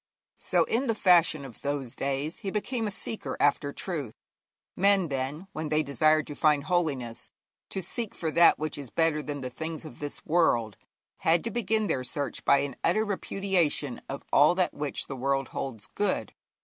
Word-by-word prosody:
So -, -, +2 dB
in 250 Hz, +4 st, 0 dB
the 225 Hz, -, +1 dB
fashion 170 Hz, -7 st, +4 dB
of 125 Hz, -4 st, -12 dB
those 140 Hz, -4 st, -3 dB
days 140 Hz, +4 st, -2 dB
he 195 Hz, -, -4 dB
became 225 Hz, +3 st, -2 dB
a -, -, -1 dB
seeker 210 Hz, +2 st, -3 dB
after 145 Hz, 0 st, +2 dB
truth. 145 Hz, -, -4 dB, 0.6 s
Men, 195 Hz, -3 st, +3 dB
then, 140 Hz, +5 st, -3 dB
when 155 Hz, -3 st, -4 dB
they 155 Hz, +1 st, +2 dB
desired 155 Hz, +2 st, +3 dB
to 145 Hz, -, -7 dB
find 150 Hz, -2 st, +3 dB
holiness, 145 Hz, -9 st, -1 dB, 0.4 s
to 190 Hz, -, -3 dB
seek 225 Hz, +4 st, -4 dB
for 160 Hz, -2 st, -2 dB
that 170 Hz, +2 st, +6 dB
which 155 Hz, -1 st, -3 dB
is 140 Hz, -4 st, -7 dB
better 160 Hz, 0 st, +1 dB
than 145 Hz, -1 st, -5 dB
the 130 Hz, -1 st, -5 dB
things 160 Hz, +3 st, -5 dB
of 120 Hz, -, -11 dB
this 145 Hz, -1 st, -5 dB
world, 120 Hz, -10 st, +2 dB, 0.4 s
had 165 Hz, +1 st, +2 dB
to 230 Hz, -, -3 dB
begin 220 Hz, -2 st, 0 dB
their 130 Hz, -10 st, -1 dB
search 140 Hz, 0 st, -3 dB
by 140 Hz, 0 st, +5 dB
an 140 Hz, -2 st, -4 dB
utter 215 Hz, +6 st, +3 dB
repudiation 190 Hz, -, 0 dB
of 140 Hz, -, -5 dB
all 150 Hz, +5 st, +6 dB
that 185 Hz, -1 st, +1 dB
which 145 Hz, -1 st, -3 dB
the 135 Hz, -, -6 dB
world 135 Hz, +1 st, 0 dB
holds 115 Hz, -6 st, -5 dB
good. 205 Hz, -, -1 dB
155 Hz, 185 wpm, -28 LUFS, 140-180 Hz, 0.6 s, that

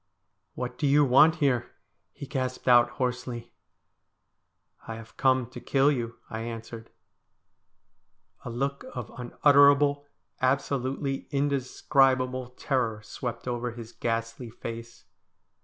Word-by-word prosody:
' -, -, -50 dB
What 125 Hz, 0 st, -5 dB
do 145 Hz, -, +1 dB
you 145 Hz, +1 st, +5 dB
want 145 Hz, +5 st, +6 dB
here? 140 Hz, -7 st, 0 dB, 0.2 s
' -, -, -48 dB
he -, -, -9 dB
gasped 130 Hz, -2 st, -4 dB
out 120 Hz, -1 st, +6 dB
hoarsely. 125 Hz, -2 st, -3 dB, 0.7 s
' -, -, -31 dB
I 115 Hz, -, -5 dB
have 115 Hz, 0 st, -12 dB
come 130 Hz, -2 st, +2 dB
to -, -, -9 dB
kill 140 Hz, +1 st, +3 dB
you,' 120 Hz, -4 st, -3 dB
I 110 Hz, -, -5 dB
answered. 115 Hz, 0 st, -7 dB, 1.5 s
A -, -, -6 dB
look 140 Hz, +4 st, -2 dB
of 125 Hz, -4 st, -6 dB
unutterable, 145 Hz, +3 st, +4 dB, 0.3 s
absolutely 135 Hz, +1 st, -1 dB
indescribable, 130 Hz, -2 st, +1 dB
terror 115 Hz, -6 st, -1 dB
swept 125 Hz, +2 st, -6 dB
over 120 Hz, -1 st, -2 dB
his 115 Hz, -1 st, -9 dB
ghastly 115 Hz, +1 st, -3 dB
face. 115 Hz, +1 st, -8 dB
125 Hz, 125 wpm, -27 LUFS, 120-140 Hz, 1.5 s, want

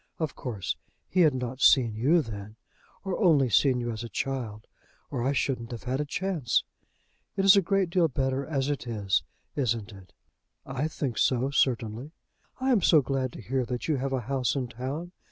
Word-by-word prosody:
Of 160 Hz, -4 st, -2 dB
course 110 Hz, -8 st, -4 dB, 0.3 s
he 185 Hz, -, -1 dB
had 155 Hz, -6 st, +5 dB
not 125 Hz, +1 st, -4 dB
seen 120 Hz, -5 st, +5 dB
you 145 Hz, +10 st, +3 dB
then, 105 Hz, -2 st, -8 dB, 0.5 s
or 190 Hz, -2 st, -1 dB
only 150 Hz, -, +4 dB
seen 130 Hz, +2 st, +4 dB
you 120 Hz, -1 st, -2 dB
as 110 Hz, 0 st, -5 dB
a 115 Hz, -, -6 dB
child, 115 Hz, -5 st, -3 dB, 0.5 s
or 130 Hz, -, -2 dB
I 130 Hz, +3 st, +1 dB
shouldn't 125 Hz, -3 st, -1 dB
have 120 Hz, -2 st, -7 dB
had 130 Hz, +3 st, -1 dB
a -, -, -2 dB
chance. 160 Hz, -5 st, 0 dB, 0.7 s
It 195 Hz, -, +2 dB
is 195 Hz, +1 st, +9 dB
a 200 Hz, -, +6 dB
great 195 Hz, -1 st, +1 dB
deal 175 Hz, -2 st, +4 dB
better 135 Hz, -1 st, -1 dB
as 140 Hz, -3 st, -1 dB
it 140 Hz, -3 st, -4 dB
is, 105 Hz, -5 st, +1 dB, 0.3 s
isn't 115 Hz, -5 st, -1 dB
it?" 95 Hz, -2 st, -14 dB, 0.5 s
"I 135 Hz, +4 st, -2 dB
think 140 Hz, -6 st, -3 dB
so, 130 Hz, +1 st, +2 dB
certainly." 125 Hz, +1 st, 0 dB, 0.5 s
"I 260 Hz, +1 st, +1 dB
am 230 Hz, -6 st, +4 dB
so 155 Hz, -4 st, +5 dB
glad 130 Hz, 0 st, -1 dB
to -, -, -9 dB
hear 130 Hz, +4 st, 0 dB
that 125 Hz, 0 st, -4 dB
you 155 Hz, -3 st, +1 dB
have 135 Hz, +1 st, -2 dB
a 130 Hz, -2 st, 0 dB
house 130 Hz, 0 st, -1 dB
in 130 Hz, -3 st, -2 dB
town. 135 Hz, +9 st, -5 dB
130 Hz, 195 wpm, -28 LUFS, 120-150 Hz, 0.7 s, is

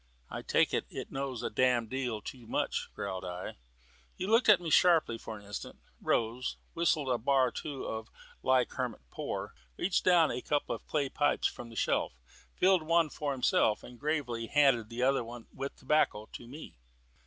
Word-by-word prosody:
"I -, -, -4 dB
take -, -, +2 dB
it, -, -, 0 dB
it -, -, -7 dB
knows 135 Hz, -3 st, -3 dB
a -, -, -2 dB
damned 125 Hz, -3 st, +2 dB
deal 125 Hz, -5 st, -2 dB
too 120 Hz, -4 st, -9 dB
much," -, -, -1 dB
growled 95 Hz, -2 st, -4 dB
I. 90 Hz, 0 st, -6 dB, 0.6 s
He -, -, -3 dB
looked 225 Hz, +3 st, +4 dB
at 205 Hz, -3 st, +8 dB
me 170 Hz, -3 st, -4 dB
sharply 160 Hz, -11 st, +4 dB
for 110 Hz, -, -7 dB
an 100 Hz, -, -14 dB
instant, 100 Hz, 0 st, -7 dB, 0.2 s
rose, 115 Hz, +3 st, 0 dB, 0.2 s
whistled 165 Hz, -4 st, +1 dB
a 125 Hz, -2 st, +1 dB
bar 130 Hz, +1 st, +3 dB
or -, -, -15 dB
two 145 Hz, -4 st, -5 dB
of 110 Hz, +1 st, -5 dB, 0.3 s
"Like 130 Hz, -2 st, +3 dB
Hermit 125 Hz, -, -3 dB
Poor," -, -, -4 dB, 0.2 s
reached 180 Hz, -, +1 dB
down 175 Hz, -3 st, +5 dB
a 125 Hz, -, -3 dB
couple 145 Hz, +2 st, 0 dB
of -, -, -13 dB
clay 145 Hz, -3 st, 0 dB
pipes 145 Hz, +2 st, +1 dB
from 120 Hz, -, -2 dB
the 115 Hz, -, -12 dB
shelf, -, -, +1 dB, 0.4 s
filled 185 Hz, -1 st, +4 dB
one 165 Hz, -1 st, +2 dB
for 145 Hz, -2 st, -2 dB
himself, 125 Hz, -4 st, +2 dB
and 120 Hz, -1 st, -12 dB
gravely 130 Hz, -7 st, -1 dB
handed 135 Hz, -6 st, +3 dB
the 120 Hz, +1 st, -2 dB
other 135 Hz, -1 st, +3 dB
with 120 Hz, +4 st, -7 dB
the -, -, -23 dB
tobacco 130 Hz, -7 st, +2 dB
to 120 Hz, -, -8 dB
me. 135 Hz, -, -10 dB
130 Hz, 190 wpm, -31 LUFS, 115-150 Hz, 0.6 s, at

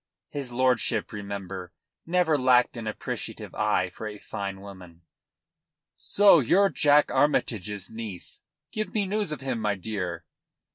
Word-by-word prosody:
His 140 Hz, -4 st, -3 dB
lordship, 125 Hz, -3 st, +1 dB
remember, 100 Hz, -3 st, -6 dB, 0.3 s
never 170 Hz, -2 st, +3 dB
lacked 125 Hz, -3 st, +4 dB
an 115 Hz, -2 st, -5 dB
appreciative 110 Hz, -, -5 dB
eye -, -, +1 dB
for 110 Hz, -, -7 dB
a 105 Hz, -1 st, -7 dB
fine 100 Hz, -1 st, -5 dB
woman. 90 Hz, -4 st, -12 dB, 0.9 s
"So 200 Hz, -4 st, +5 dB
you're 190 Hz, -, +4 dB
Jack 145 Hz, -3 st, +4 dB
Armytage's 105 Hz, -9 st, 0 dB
niece. 110 Hz, -6 st, -7 dB, 0.3 s
Give 215 Hz, -3 st, -3 dB
me 205 Hz, -2 st, +2 dB
news 205 Hz, -3 st, -1 dB
of 150 Hz, -, -5 dB
him, 130 Hz, -3 st, -2 dB
my 105 Hz, -2 st, 0 dB
dear." 90 Hz, -4 st, -4 dB
115 Hz, 135 wpm, -27 LUFS, 100-145 Hz, 0.9 s, So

